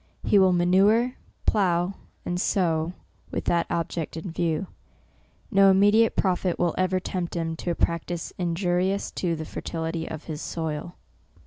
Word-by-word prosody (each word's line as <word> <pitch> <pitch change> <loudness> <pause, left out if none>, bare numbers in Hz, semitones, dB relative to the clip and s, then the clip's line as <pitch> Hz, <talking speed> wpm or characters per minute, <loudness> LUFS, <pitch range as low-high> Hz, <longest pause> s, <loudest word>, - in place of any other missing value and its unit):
He 205 - +4
will 190 -1 +5
manure, 195 +8 +4 0.3
plough 180 -2 +2 0.3
and 175 0 -1
sow, 170 -4 +1 0.4
with - - -4
that 170 -1 +1
object 165 -1 -3
in 165 +2 -5
view. 165 +1 -1 0.9
No 195 0 +6
immediate 205 +4 +5
pro 185 -2 +2
tit 180 -1 -2
will 175 -2 +1
ever 185 0 +1
tempt 180 -2 -4
him 165 -1 -2
to 175 - -4
a 170 - 0
practice 170 +1 -2
injurious 180 +2 0
to 170 -3 -1
the 160 0 -5
fertility 165 +1 -4
of 160 -1 -6
his 155 -1 -6
soil. 160 +1 -4
175 Hz, 150 wpm, -26 LUFS, 165-190 Hz, 0.9 s, No